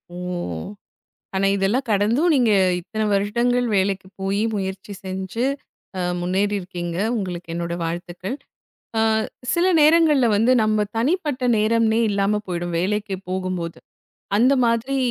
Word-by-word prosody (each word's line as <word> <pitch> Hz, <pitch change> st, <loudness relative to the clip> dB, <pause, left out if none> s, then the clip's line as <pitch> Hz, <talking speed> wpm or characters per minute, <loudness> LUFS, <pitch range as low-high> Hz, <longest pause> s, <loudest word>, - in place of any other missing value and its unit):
ஓ! -, -, -7 dB, 1.2 s
ஆனா 195 Hz, +1 st, +2 dB
இதெல்லாம் 210 Hz, +8 st, 0 dB
கடந்தும் 230 Hz, -, +3 dB
நீங்க 245 Hz, -4 st, +3 dB, 0.3 s
இத்தனை 215 Hz, +5 st, -3 dB
வருடங்கள் 235 Hz, +5 st, +1 dB
வேலைக்கு 190 Hz, 0 st, 0 dB
போயி 195 Hz, +2 st, 0 dB
முயற்சி 195 Hz, 0 st, -4 dB
செஞ்சு 190 Hz, +5 st, -3 dB, 0.5 s
அ -, -, -1 dB, 0.2 s
முன்னேறி 195 Hz, +3 st, 0 dB
இருக்கீங்க. 175 Hz, -2 st, -5 dB, 0.2 s
உங்களுக்கு 180 Hz, -4 st, -4 dB
என்னோட 170 Hz, 0 st, -3 dB
வாழ்த்துக்கள். 175 Hz, +7 st, -4 dB, 0.6 s
அ -, -, +3 dB, 0.5 s
சில 345 Hz, +1 st, +2 dB, 0.2 s
நேரங்கள்ல 305 Hz, -4 st, +5 dB
வந்து 225 Hz, +5 st, +3 dB
நம்ம 215 Hz, -1 st, +1 dB
தனிப்பட்ட 280 Hz, -1 st, 0 dB
நேரம்னே 225 Hz, +1 st, +2 dB
இல்லாம 200 Hz, +1 st, +1 dB
போயிடும் 175 Hz, -1 st, -3 dB
வேலைக்கு 205 Hz, +2 st, -1 dB
போகும்போது. 185 Hz, -2 st, -3 dB, 0.6 s
அந்த 255 Hz, +5 st, +5 dB
மாதிரி 235 Hz, +4 st, 0 dB
205 Hz, 120 wpm, -22 LUFS, 185-235 Hz, 1.2 s, நேரங்கள்ல